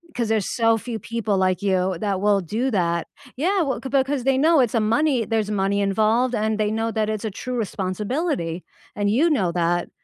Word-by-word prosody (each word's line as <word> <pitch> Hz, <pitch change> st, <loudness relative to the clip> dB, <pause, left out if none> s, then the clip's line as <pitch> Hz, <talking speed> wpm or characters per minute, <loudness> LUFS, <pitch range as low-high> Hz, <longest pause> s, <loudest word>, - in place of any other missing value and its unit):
'Cause 235 Hz, -3 st, -1 dB
there's 220 Hz, -4 st, 0 dB
so 225 Hz, -1 st, +2 dB
few 225 Hz, 0 st, -5 dB
people 225 Hz, -3 st, -2 dB
like 185 Hz, -1 st, +1 dB
you, 185 Hz, -2 st, +1 dB
that 195 Hz, -3 st, -1 dB
will 205 Hz, -1 st, +3 dB
do 220 Hz, +9 st, -2 dB
that. 170 Hz, -4 st, 0 dB, 0.3 s
Yeah 370 Hz, +8 st, +1 dB
well 270 Hz, -3 st, -2 dB
‘c 265 Hz, -, -6 dB
because 270 Hz, -1 st, +1 dB
they 270 Hz, -1 st, +3 dB
know 320 Hz, 0 st, +4 dB
it's 245 Hz, -4 st, +2 dB
a -, -, +3 dB
money 240 Hz, +4 st, +2 dB
there's 220 Hz, -2 st, -1 dB
money 200 Hz, 0 st, 0 dB
involved, 220 Hz, +5 st, +2 dB
and 215 Hz, 0 st, -1 dB
they 210 Hz, -, +1 dB
know 225 Hz, +1 st, -1 dB
that 215 Hz, -1 st, -1 dB
it's 215 Hz, 0 st, -4 dB
a -, -, -1 dB
true 250 Hz, +6 st, -6 dB
responsibility, 200 Hz, -, -2 dB, 0.3 s
and 205 Hz, -1 st, 0 dB
you 290 Hz, +10 st, +3 dB
know 195 Hz, -, +1 dB
that. 175 Hz, 0 st, 0 dB
215 Hz, 210 wpm, -22 LUFS, 195-250 Hz, 0.3 s, know